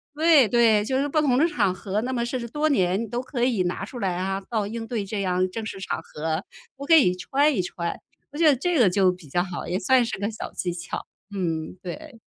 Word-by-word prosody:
对， 310 -5 +5
对， 225 -2 +4
就 260 +3 0
是 285 - 0
不 310 - +1
同 255 -4 +2
的 320 - +4
场 205 - +1
合， 195 +2 -3
那 255 +3 -3
么 240 -2 0
甚 255 +2 -3
至 235 - -5
多 300 +5 0
年 195 -3 +1
都 240 - -2
可 255 -2 -3
以 235 -7 +2
拿 175 +2 -3
出 245 - -9
来 190 -5 -1
啊， 195 +1 -2
到 215 -4 -1
应 225 +2 -5
对 230 -5 -2
这 200 +1 -3
样 185 -1 +1
正 220 +4 -5
式 200 - -6
场 190 - -3
合， 160 +3 -3 0.3
我 280 +1 -8
可 330 - +4
以 210 - +5
穿 280 +9 +1
一 185 - +1
穿。 170 -1 -4 0.3
我 290 - -8
觉 330 - +4
得 290 - +6
这 340 +6 0
个 220 -6 +6
就 185 0 +3
比 180 -3 -11
较 175 +6 0
好， 180 -2 -6
也 180 +2 -1
算 250 +5 +4
是 230 - -4
个 205 +1 -1
小 220 - -7
技 175 -1 -2
巧， 170 0 -6 0.3
嗯， 165 -4 -2
对。 255 - -8
215 Hz, 270 characters per minute, -24 LUFS, 185-260 Hz, 0.3 s, 得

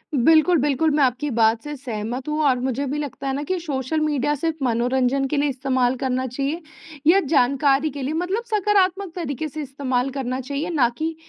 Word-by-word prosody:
बिल्कुल, 320 +6 +5
बिल्कुल 295 +2 +2
मैं 295 - +3
आपकी 260 +3 0
बात 225 0 +3
से 295 0 -5
सहमत 245 -1 -5
हूँ 300 +1 -1
और 255 -3 +3
मुझे 260 +2 -2
भी 285 +3 -2
लगता 285 -1 -5
है 270 - 0
ना 285 - -2
कि 370 +5 -1
सोशल 290 -2 -2
मीडिया 295 -1 0
सिर्फ़ 310 0 -3
मनोरंजन 250 +3 +1
के 295 - -2
लिए 290 +1 +2
इस्तेमाल 260 -1 0
करना 260 0 0
चाहिए 275 +6 -3 0.5
या 360 +4 +7
जानकारी 280 -1 +2
के 285 0 -7
लिए, 270 +3 -2
मतलब 360 +7 -1
सकारात्मक 390 -2 +2
तरीके 310 -3 -3
से 305 +1 -6
इस्तेमाल 270 -2 -2
करना 260 -1 -3
चाहिए 280 +6 -4
ना 285 -8 +3
कि 320 +1 -2
280 Hz, 195 wpm, -22 LUFS, 255-310 Hz, 0.5 s, या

